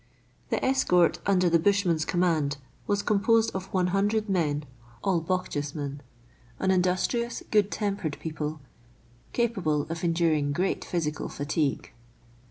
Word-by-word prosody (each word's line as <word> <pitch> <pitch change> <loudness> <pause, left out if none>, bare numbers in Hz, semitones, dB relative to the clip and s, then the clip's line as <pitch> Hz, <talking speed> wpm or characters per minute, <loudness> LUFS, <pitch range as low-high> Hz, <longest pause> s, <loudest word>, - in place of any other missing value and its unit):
The - - 0
escort 180 -10 +3
under 185 -2 +3
the 170 -1 +4
bushman's 175 -4 +2
command 160 -5 +1 0.3
was 205 -1 +1
composed 220 +2 +3
of 190 0 -5
100 195 +4 +1
men, 155 -6 0 0.4
all 185 -4 +2
Bochjesmen 145 -5 -3 0.3
— 120 0 -29
an 190 - +2
industrious, 185 +6 0
good 210 -2 +4
tempered 200 -8 -2
people, 155 -1 -4 0.7
capable 190 -12 0
of 165 +1 -5
enduring 165 -4 +2
great 180 +5 0
physical 155 -3 -2
fatigue. 145 0 -2
175 Hz, 120 wpm, -27 LUFS, 155-200 Hz, 0.7 s, the